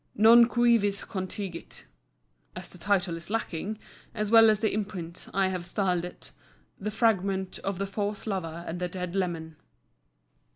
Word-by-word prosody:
Non 230 +2 +8
cuivis 230 -4 +2
contingit. 185 -2 -5 0.7
As - - -7
the 180 - -10
title 190 -3 +1
is 165 - -7
lacking, 215 -1 -3 0.4
as 210 -1 -2
well 225 -1 +8
as 215 -2 +3
the 220 -1 0
imprint, 190 -5 -5
I 195 -1 +2
have 185 -2 -3
styled 180 -1 0
it 180 - -10 0.5
THE 210 - -3
FRAGMENT 195 -4 +1
OF 195 -2 -3
THE 195 - -1
FAUSE 205 +1 -3
LOVER 170 -5 -3
AND 170 +2 -5
THE 180 - -1
DEAD 180 0 -5
LEMAN. 165 -4 -2
195 Hz, 155 wpm, -28 LUFS, 180-210 Hz, 0.7 s, Non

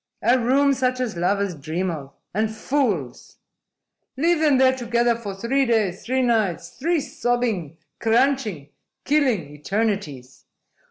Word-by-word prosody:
A 255 +2 +4
room 275 +4 +3
such 255 -1 0
as 245 -6 -2
lovers 195 +2 0
dream 165 +5 -3
of 140 -4 -7 0.2
and 215 +3 0
fools! 220 - -2 0.8
Leave 335 +3 +2
them 300 -4 +4
there 260 0 +4
together 240 -1 +1
for 205 -4 -6
three 240 +7 +1
days, 215 -5 0
three 260 +2 0
nights, 210 -8 0
three 330 - -1
sobbing, 230 - -2 0.2
crunching, 225 - +1 0.4
killing 250 - +1
eternities! 175 - -3
230 Hz, 125 wpm, -23 LUFS, 180-260 Hz, 0.8 s, A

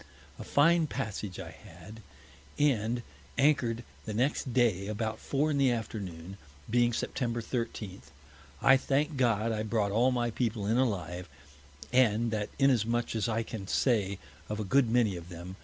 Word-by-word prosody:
A - - -5
fine 165 +2 +4
Passage 105 -9 -4
I - - -7
had, 90 +7 -13 0.6
and 120 -4 +1 0.3
anchor'd 130 -5 +2 0.2
the 110 - -4
next 130 +2 0
Day 115 -6 +2
about 110 +1 -3
Four 145 +3 0
in 140 - 0
the 135 -2 +4
Afternoon, 100 -6 -4 0.3
being 120 +1 +3
Sept. 120 0 -2
13. 115 -6 -4 0.6
I 135 - +7
thank 145 +3 0
God 115 -4 +2
I 110 -1 -1
brought 110 -2 0
all 120 +5 +3
my 120 -1 0
People 110 -3 -1
in 110 +4 +2
alive, 90 -8 -1 0.6
and 115 -2 +3
that 105 -2 -2
is 135 0 +5
as 115 -5 +2
much 120 0 0 0.2
I 115 +1 0
can 105 -4 -7
say 100 -5 +1 0.3
of 105 0 -3
a - - -1
good 125 +4 +3
many 115 -4 +2
of 85 0 -9
them. 90 +2 -8
115 Hz, 160 wpm, -30 LUFS, 105-125 Hz, 0.6 s, I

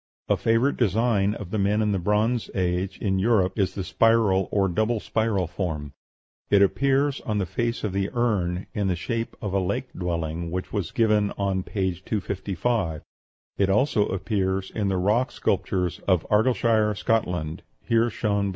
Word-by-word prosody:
A - - +4
favorite 115 +5 +1
design 105 -2 +2
of 95 -3 -8
the 110 - -1
men 100 +2 +2
of 105 -1 +1
the 100 - 0
Bronze 105 +5 +1
Age 90 0 -1
in 95 -2 0
Europe 95 -2 +2
is 95 - +1
the 95 - -3
spiral 105 -1 +3
or 100 -2 +2
double 110 +5 0
spiral 110 -4 0
form. 80 -4 -4 0.6
It 100 -1 +6
appears 135 +6 +1
on 105 -2 -2
the 100 - 0
face 115 +7 -2
of 105 -3 -2
the 100 0 0
urn 100 -7 0
in 105 -2 -1
the 90 - +1
shape 115 +6 -3
of 100 -2 -3
a 100 - +2
lake 125 +8 -2
dwelling, 85 -1 -3
which 90 +2 -4
is 100 -6 -1
given 105 -3 +2
on 95 -1 0
p. 95 0 -1
255; 95 -3 -2 0.6
it 100 -1 +3
also 105 +1 +2
appears 95 -1 -1
in 105 -3 -1
the 95 -1 0
rock 110 +7 +1
sculptures 90 -2 -1
of 90 -4 +2
Argyleshire, 110 -1 +3
Scotland, 90 -9 -1 0.2
here 115 +1 +2
shown. 100 -3 0
100 Hz, 170 wpm, -25 LUFS, 95-110 Hz, 0.6 s, It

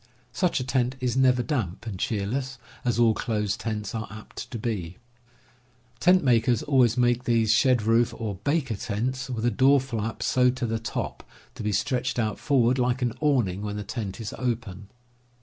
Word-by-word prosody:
Such 180 -6 +1
a - - -2
tent 125 0 0
is 125 -2 -1
never 130 -2 +4
damp 115 - -3
and 100 -5 -5
cheerless, 120 +7 -2 0.3
as 120 -2 0
all 115 -2 +5
closed 105 -3 -2
tents 105 -3 -4
are 110 -1 -4
apt 110 +3 -9
to 120 - -5
be. 100 -6 -4 1.0
Tent 180 0 +5
makers 120 -2 +3
always 130 -5 +3
make 120 0 +2
these 115 -2 +3
shed 125 -1 +3
roof 115 +2 +3
or 105 -5 -4
"baker" 140 -6 0
tents 125 +4 -3
with 120 -2 -2
a 120 - +3
door 135 +5 +5
flap 115 -4 -4
sewed 125 0 +2
to 130 - -1
the 115 -1 -1
top, 110 - -4 0.3
to - - -9
be 105 0 -1
stretched 125 +6 -1
out 110 -4 -1
forward 130 -2 +2
like 125 +1 +1
an 120 -2 0
awning 120 -11 +1
when 105 0 -4
the 105 - -4
tent 105 -1 -5
is 110 -3 -5
open. 110 -6 -3
120 Hz, 185 wpm, -26 LUFS, 110-130 Hz, 1.0 s, all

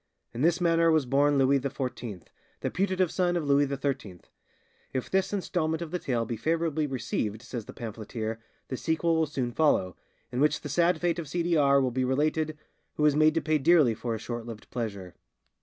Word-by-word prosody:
In 120 - -4
this 170 +3 +3
manner 165 -1 +3
was 155 -4 +3
born 140 +3 +3
Louis 135 +1 +4
XIV, 125 - -5 0.4
the - - -2
putative 185 -2 +1
son 175 -1 +1
of 165 - -2
Louis 140 0 +4
XIII. 135 - -3 0.7
If 130 -2 -3
this 190 0 +1
instalment 170 -5 -1
of 160 - -8
the 180 - -2
tale 120 -6 -1
be 115 0 -4
favourably 160 +3 0
received, 115 -4 -3
says 120 -3 -6
the - - -10
pamphleteer, 110 0 -5 0.3
the 130 - -3
sequel 165 +3 +1
will 160 -1 +2
soon 130 -5 -2
follow, 115 - +2 0.4
in 125 - -2
which 150 +1 +2
the 145 - -6
sad 170 +3 +2
fate 175 0 0
of 160 - -5
C. 170 +4 -1
D. 170 0 +1
R. 140 -2 +5
will 130 -2 +1
be 130 +2 0
related, 155 +4 0 0.4
who 150 - -1
was 150 -1 +4
made 155 +1 +4
to 165 - +2
pay 155 -1 +1
dearly 150 -5 +5
for 115 +1 -3
his 110 - -5
short 120 -1 -5
lived 110 -2 -9
pleasure." 100 -7 -4
145 Hz, 205 wpm, -28 LUFS, 120-165 Hz, 0.7 s, R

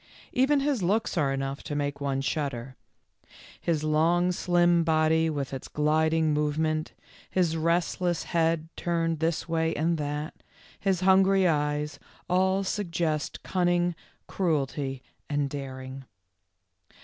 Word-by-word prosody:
Even 275 +3 +3
his 275 -5 0
looks 205 +6 +1
are 145 -5 +2
enough 135 0 -3
to 145 - -5
make 145 -1 -2
one 135 -1 -1
shudder. 135 -3 -3 0.8
His 160 -3 -1
long, 165 +4 +3
slim 175 -1 +3
body 160 0 +3
with 140 -3 -3
its 135 - -5
gliding 155 +1 +2
movement, 155 +1 0 0.4
his 175 -3 +1
restless 170 +1 0
head 165 -2 0
turned 165 -2 -1
this 165 0 -1
way 165 -1 0
and 165 +1 0
that, 150 +1 -3 0.5
his 190 -2 0
hungry 190 0 +5
eyes, 150 -1 0 0.3
all 190 +2 +2
suggest 170 -6 -2
cunning, 175 -1 +1 0.3
cruelty, 140 -6 -1 0.3
and 145 -1 0
daring. 130 -1 -7
160 Hz, 120 wpm, -27 LUFS, 145-175 Hz, 0.8 s, hungry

